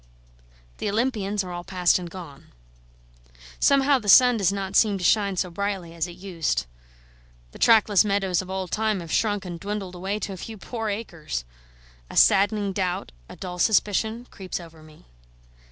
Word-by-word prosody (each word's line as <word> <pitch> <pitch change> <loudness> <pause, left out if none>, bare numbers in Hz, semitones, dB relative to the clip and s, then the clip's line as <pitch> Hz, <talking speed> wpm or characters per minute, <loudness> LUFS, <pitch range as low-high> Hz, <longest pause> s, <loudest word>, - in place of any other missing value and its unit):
The - - -1
Olympians 210 -3 -1
are 180 - -7
all 175 0 -5
past 180 -1 +2
and 175 -1 -7
gone. 165 -6 -11 1.1
Somehow 275 0 +4
the 210 - -4
sun 250 +4 +8
does 195 -4 +2
not 195 -1 -4
seem 210 -3 +4
to 185 - -7
shine 200 0 +2
so 180 0 -1
brightly 190 -2 -3
as 170 0 -2
it 175 - -9
used; 180 -3 -2 0.9
the - - -13
trackless 215 -3 +5
meadows 195 -3 0
of 185 - -11
old 190 -2 -4
time 215 -2 0
have 165 -1 -9
shrunk 205 -3 0
and 175 -2 -6
dwindled 200 -1 -5
away 190 +3 -3
to 200 -1 -4
a - - -8
few 220 +4 -8
poor 225 +2 -4
acres. 165 - -5 0.6
A - - -7
saddening 200 0 +4
doubt, 180 - -2 0.2
a - - -10
dull 180 -1 -7
suspicion, 220 +3 +1
creeps 185 -2 -6
over 165 -2 -13
me. 155 -1 -17
195 Hz, 170 wpm, -24 LUFS, 180-210 Hz, 1.1 s, sun